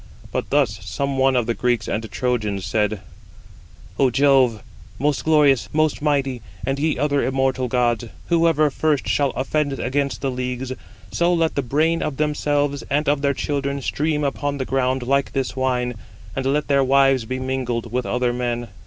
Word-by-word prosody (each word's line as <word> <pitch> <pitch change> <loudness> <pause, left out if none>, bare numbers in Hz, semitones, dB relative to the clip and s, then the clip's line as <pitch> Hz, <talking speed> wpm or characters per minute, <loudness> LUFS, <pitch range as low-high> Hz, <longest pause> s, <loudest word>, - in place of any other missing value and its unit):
But - - -3
thus 130 -8 +1
some 140 -1 -2
one 135 0 +3
of 120 -2 +2
the 115 - 0
Greeks 120 -2 0
and 110 +1 -3
Trojans 110 -6 -1
said: 105 -2 0 1.0
"Ο 135 -2 +5
Jove, 130 -5 +3 0.3
most 145 +1 0
glorious, 150 -5 +3
most 155 -1 +1
mighty, 140 -4 0 0.2
and 135 +1 -1
ye 155 +1 +1
other 145 +1 +1
immortal 130 -1 0
gods, 120 -1 +1 0.2
whoever 165 -3 +3
first 150 -1 0
shall 140 -1 +2
offend 140 +2 0
against 135 +1 -2
the 135 - -1
leagues, 125 0 -4 0.4
so 170 +1 +2
let 165 -2 +1
the 140 - 0
brain 155 +6 +1
of 135 - -3
themselves 145 -1 0
and 150 +2 0
of 145 0 +2
their 140 -1 +1
children 140 0 -2
stream 150 +3 -1
upon 140 +2 -1
the 130 - -2
ground 130 -1 0
like 140 +2 0
this 135 -2 -2
wine, 125 -2 0 0.4
and 135 0 -1
let 150 +2 0
their 140 -1 +3
wives 135 -2 +3
be 130 +3 -3
mingled 125 -3 -3
with 125 0 -1
other 125 0 0
men." 120 -1 -2
135 Hz, 170 wpm, -22 LUFS, 125-145 Hz, 1.0 s, Ο